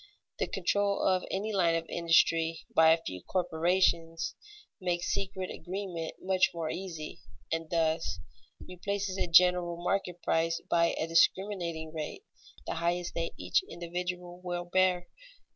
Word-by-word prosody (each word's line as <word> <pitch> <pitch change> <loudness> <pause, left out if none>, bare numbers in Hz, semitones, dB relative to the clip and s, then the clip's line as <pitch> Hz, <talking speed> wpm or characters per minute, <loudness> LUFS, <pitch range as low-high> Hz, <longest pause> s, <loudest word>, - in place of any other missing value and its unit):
The - - +1
control 200 0 +1
of 185 -1 +2
any 210 +3 -2
line 170 -4 +3
of 165 0 -1
industry 165 -1 +2
by 160 0 +6
a 165 0 +3
few 90 - -6
corporations 170 - +1 0.5
makes 175 -1 -1
secret 190 -1 -3
agreement 180 -3 -5
much 185 -1 +3
more 165 -2 -2
easy, 170 -5 -6 0.3
and 165 -1 -2
thus 160 - 0 0.5
replaces 195 +1 -3
a - - 0
general 175 0 +5
market 180 0 -1
price 165 0 +1
by 170 0 +3
a - - +1
discriminating 170 -1 +1
rate, 155 - -5 0.4
the - - -2
highest 175 +1 -1
that 165 0 -2
each 90 0 +2
individual 180 +1 -5
will 175 -1 -3
bear. 180 0 +2
175 Hz, 135 wpm, -30 LUFS, 165-185 Hz, 0.5 s, by